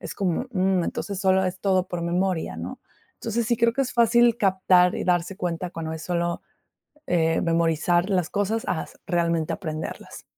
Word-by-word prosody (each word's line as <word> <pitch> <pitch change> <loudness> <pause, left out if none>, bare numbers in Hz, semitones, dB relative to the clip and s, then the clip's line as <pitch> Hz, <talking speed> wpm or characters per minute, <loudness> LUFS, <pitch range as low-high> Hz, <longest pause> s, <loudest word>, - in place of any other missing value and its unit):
Es - - -7
como: 195 +5 -1
"Mm, 185 -2 +2
entonces 200 +2 -4
solo 190 -1 +3
es 185 0 -3
todo 190 -2 +2
por 175 -1 -4
memoria", 170 - -1
¿no?, 85 +3 -7 0.4
entonces, 230 0 -2
sí 235 -1 +1
creo 230 0 +3
que 275 - +1
es 255 - -4
fácil 235 0 +4
captar 185 -3 +4
y - - -3
darse 180 +1 0
cuenta 175 -1 -3
cuando 160 -2 -5
es 160 - -6
solo, 170 -1 -1 0.7
eh, 165 -2 +1
memorizar 170 +2 +1
las 180 -4 0
cosas 210 +2 -1
a 165 - -1
s - - -17
realmente 170 -2 0
aprenderlas. 155 -3 -6
180 Hz, 180 wpm, -24 LUFS, 170-200 Hz, 0.7 s, fácil